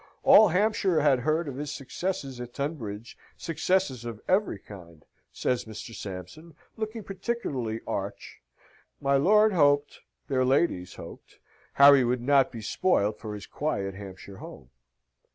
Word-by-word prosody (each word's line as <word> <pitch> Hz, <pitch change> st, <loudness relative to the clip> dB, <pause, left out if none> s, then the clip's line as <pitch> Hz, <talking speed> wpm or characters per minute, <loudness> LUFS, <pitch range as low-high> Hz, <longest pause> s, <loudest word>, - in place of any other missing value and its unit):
"All 215 Hz, -, +8 dB
Hampshire 190 Hz, -2 st, +2 dB
had 140 Hz, -3 st, +4 dB
heard 155 Hz, +5 st, 0 dB
of 135 Hz, -2 st, -6 dB
his 145 Hz, 0 st, -4 dB
successes 135 Hz, -2 st, -4 dB
at 120 Hz, 0 st, -9 dB
Tunbridge, 120 Hz, -7 st, -5 dB, 0.2 s
successes 165 Hz, -5 st, -1 dB
of 115 Hz, -3 st, -6 dB
every 190 Hz, -, +1 dB
kind," 85 Hz, -5 st, -14 dB, 0.3 s
says 125 Hz, -1 st, -1 dB
Mr. 110 Hz, +1 st, -9 dB
Sampson, 100 Hz, -, -9 dB, 0.2 s
looking 220 Hz, 0 st, -5 dB
particularly 145 Hz, -, -3 dB
arch; -, -, -5 dB, 0.6 s
my 140 Hz, 0 st, +1 dB
lord 210 Hz, +9 st, +4 dB
hoped, 145 Hz, -3 st, +2 dB, 0.3 s
their 130 Hz, -3 st, +1 dB
ladyships 130 Hz, -, +1 dB
hoped, -, -, -12 dB, 0.4 s
Harry 140 Hz, -1 st, +7 dB
would 120 Hz, 0 st, 0 dB
not 135 Hz, 0 st, +3 dB
be 115 Hz, -3 st, -8 dB
spoilt 105 Hz, -, +1 dB
for 105 Hz, -1 st, -6 dB
his 105 Hz, -, -8 dB
quiet 100 Hz, -11 st, -3 dB
Hampshire 95 Hz, 0 st, -10 dB
home. 65 Hz, -7 st, -12 dB
135 Hz, 135 wpm, -27 LUFS, 110-165 Hz, 0.6 s, All